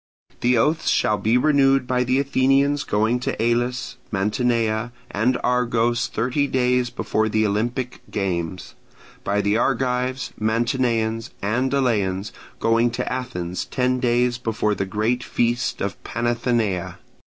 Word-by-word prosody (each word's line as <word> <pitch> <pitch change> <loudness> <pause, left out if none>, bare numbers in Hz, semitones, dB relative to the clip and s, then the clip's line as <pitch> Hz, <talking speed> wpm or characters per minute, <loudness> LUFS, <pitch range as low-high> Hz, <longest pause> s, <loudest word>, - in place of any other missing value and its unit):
The 125 0 +3
oaths 150 +8 +2
shall 105 -1 +2
be 110 +4 +2
renewed 135 -1 +3
by 125 0 +1
the 130 +2 +1
Athenians 140 +1 +2
going 110 +4 +1
to 125 - -3
Elis, 120 +2 0
Mantinea, 110 +2 0 0.2
and 120 +5 +1
Argos 120 -1 +1
thirty 125 +5 0
days 125 -1 +1
before 110 -3 -1
the 110 0 +2
Olympic 120 +5 -2
games: 90 -3 -3 0.5
by 100 +1 +1
the 100 +2 +1
Argives, 125 +1 0
Mantineans, 115 0 0
and 125 +6 0
Eleans 105 -8 0 0.3
going 115 +1 +3
to 120 - -3
Athens 90 -9 -4
ten 125 0 0
days 120 0 +1
before 110 -3 0
the 95 -1 -2
great 110 +5 0
feast 120 +1 -1
of 100 - 0
the - - -15
Panathenaea. 115 -6 -1
120 Hz, 130 wpm, -22 LUFS, 110-125 Hz, 0.5 s, The